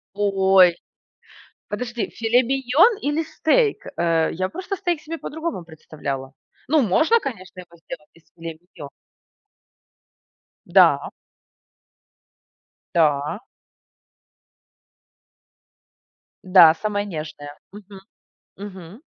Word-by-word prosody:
Ой! 190 -3 +4 0.9
Подожди, 240 +1 -4
филе-миньон 255 - +2
или 295 +3 -1
стейк? 415 +8 0
Э, 165 -1 +1
я 185 +2 -3
просто 370 - -5
стейк 350 -4 -2
себе 325 +1 -7
по-другому 320 - -5
представляла. 145 -4 -7 0.3
Ну, 310 +2 +3
можно, 315 - +3
конечно, 190 - -8
его 170 -1 -14
сделать 150 -2 -11
из 165 - -23
филе-миньон. 165 -2 -10 1.8
Да. - - +4 1.9
Да. 150 - +1 3.0
Да, 180 -4 +7
самая 205 +1 -3
нежная. 155 -5 -8
Мгм. 200 -1 -13 0.6
Мгм. 195 +1 -10
195 Hz, 80 wpm, -22 LUFS, 165-270 Hz, 3.0 s, Да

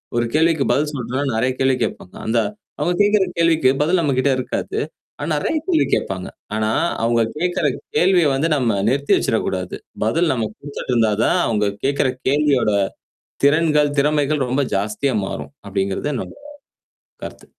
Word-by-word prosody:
ஒரு 120 - +2
கேள்விக்கு 160 -2 +3
பதில் 150 +1 +1
சொல்றனா 130 +1 -3
நெறைய 125 +3 +1
கேள்வி 130 0 +3
கேட்பாங்க. 90 - -5
அந்த 115 +2 0 0.4
அவங்க 175 - +1
கேட்கற 205 -1 +4
கேள்விக்கு 165 -5 +3
பதில் 170 +4 +2
நம்ம 145 -4 +1
கிட்ட 135 +1 +3
இருக்காது. 380 - -3 0.4
ஆனா - - -3
நெறைய 320 - 0
கேள்வி 345 -4 +3
கேடப்பாங்க, 95 -1 -1 0.3
ஆனா, 110 0 0 0.3
அவங்க 115 0 +2
கேகுற 175 0 0 0.3
கேள்விய 175 +1 +4
வந்து 140 +5 +1
நம்ம 115 -7 +1
நிறுத்தி 140 +3 +2
வச்சிடக்கூடாது, 95 -5 -1 0.3
பதில் 160 +9 +2
நம்ம 115 -3 -1
குடுத்துட்டு 140 -3 -5
இருந்தா 115 -2 +3
தான் - - +2
அவங்க 105 -3 +1
கேட்கற 140 -1 +2 0.2
கேள்வியோட, 140 -6 +2 0.7
திறன்கள், 150 -1 +3
திறமைகள் 150 -1 +1
ரொம்ப 140 +3 +1
ஜாஸ்தியா 105 +6 -1
மாறும், 115 - -6 0.2
அப்டிங்கிறத 100 +8 -1
என்னோட - - -5 0.9
கருத்து. - - -10
140 Hz, 145 wpm, -20 LUFS, 115-155 Hz, 0.9 s, கேட்கற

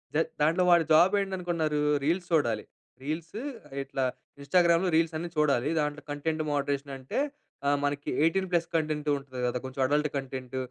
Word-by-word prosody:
జ - - +3 0.2
దాంట్లో 165 +5 +3
వాడి 170 -1 +6
జాబ్ 175 +5 +6
ఏంటనుకున్నారు? 175 -6 -1 0.2
రీల్స్ 175 +5 0
చూడాలి. 120 -9 +2 0.4
రీల్స్, 160 +7 -4 0.5
ఇట్లా 135 0 -3 0.4
ఇన్స్టాగ్రామ్‌లో 170 +4 +3
రీల్స్ 165 0 +2
అన్నీ 170 +2 -4
చూడాలి. 145 -3 +2
దాంట్లో 150 -1 -1
కంటెంట్ 155 +2 -2
మోడరేషన్ 140 0 -1
అంటే 130 - -3 0.5
ఆహ్, 145 0 +3
మనకి 145 0 -2
18 190 +4 +2
ప్లస్ 170 -1 +2
కంటెంట్ 155 -2 -1
ఉంటది 130 -2 -7
కదా! 125 +1 -1
కొంచెం 130 +1 -4
అడల్ట్ 150 +2 +2
కంటెంట్, 130 -1 -5
150 Hz, 150 wpm, -28 LUFS, 140-170 Hz, 0.5 s, వాడి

